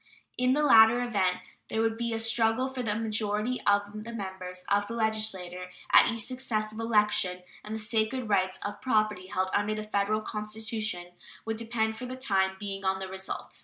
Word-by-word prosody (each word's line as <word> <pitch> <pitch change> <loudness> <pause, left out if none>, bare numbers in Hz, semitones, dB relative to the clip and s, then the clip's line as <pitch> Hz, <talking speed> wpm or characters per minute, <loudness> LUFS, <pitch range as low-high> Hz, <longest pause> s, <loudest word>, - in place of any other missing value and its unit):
In 250 +1 +2
the 300 +2 +2
latter 225 -3 +7
event 200 -7 0 0.3
there 220 - -2
would 225 0 +1
be 235 0 -2
a 225 - -1
struggle 225 +2 +2
for 260 -1 -4
a 210 -3 -1
majority 220 +2 -1
of 205 +1 +1
the 230 - -7
members 190 -4 -6
of 205 0 +3
the 230 - -5
legislature 205 -5 -2 0.2
at - - +7
each 230 -1 -2
successive 220 -3 -2
election, 210 -5 +1 0.2
and 215 +1 -5
the - - -4
sacred 220 +3 -1
rights 190 -2 +1
of 205 - -5
property 215 -6 +1
held 185 0 -1
under 205 +1 +1
the 215 - -4
Federal 215 0 0
Constitution 215 -3 -4 0.3
would 225 0 -2
depend 225 -1 -1
for 250 - -6
the 255 - -5
time 190 -7 +1
being 195 -1 -5
on 190 0 +1
the 190 0 -5
result. 190 0 -5
215 Hz, 185 wpm, -29 LUFS, 195-225 Hz, 0.3 s, latter